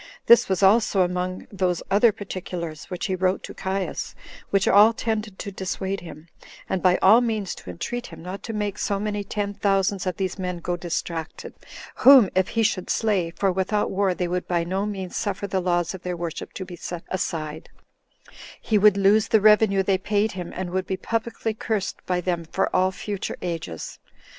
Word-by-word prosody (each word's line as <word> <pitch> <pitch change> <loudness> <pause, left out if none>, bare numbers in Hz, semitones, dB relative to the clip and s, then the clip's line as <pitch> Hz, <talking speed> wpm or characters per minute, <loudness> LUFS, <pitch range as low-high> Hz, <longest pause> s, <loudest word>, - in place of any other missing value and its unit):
This 235 - +6
was 190 +1 0
also 200 -1 +4
among 180 +1 -3
those 185 -3 -1
other 210 +3 +5
particulars 180 -5 -6
which 180 - -5
he 190 - -1
wrote 185 +1 0
to - - -8
Caius, 190 0 -3 0.3
which 195 -1 +2
all 210 +3 +7
tended 220 -3 -3
to 200 - -6
dissuade 190 +1 -3
him, 165 -2 -11 0.4
and 190 - -1
by 180 -1 +4
all 220 +6 +7
means 220 -5 -1
to - - -11
entreat 240 - -4
him - - -11
not 185 +3 -6
to 230 - -6
make 210 -2 -3
so 200 -1 -1
many 205 0 -2
ten 205 0 -3
thousands 195 -1 0
of 185 - -2
these 190 0 -3
men 180 -1 -3
go 175 +1 -2
distracted; 170 -1 -5 0.4
whom, 260 -7 +8
if 185 0 +2
he 230 - 0
should 195 -4 0
slay, 200 -6 +1
[for 190 +3 0
without 190 +3 0
war 190 -1 +1
they 180 - -1
would 180 +1 -2
by 170 -1 +1
no 190 +4 -2
means 190 -3 -5
suffer 200 -1 -2
the 190 -1 -1
laws 175 -1 0
of 190 - -8
their 180 -1 -4
worship 170 -2 -5
to 185 - -6
be 180 - -9
set 175 0 -6
aside,] 160 -4 -4 0.9
he 215 -2 +1
would 205 -1 +5
lose 200 +2 +4
the 220 - +4
revenue 210 -2 +5
they 190 -1 +1
paid 210 +2 0
him, 180 -2 -6
and 180 -1 -4
would 185 0 -2
be 190 - -2
publicly 230 0 -2
cursed 215 -3 -3
by 180 -1 +1
them 175 -1 -2
for 190 +4 -1
all 185 +1 +3
future 200 +1 -5
ages. 165 - -5
190 Hz, 195 wpm, -24 LUFS, 180-205 Hz, 0.9 s, whom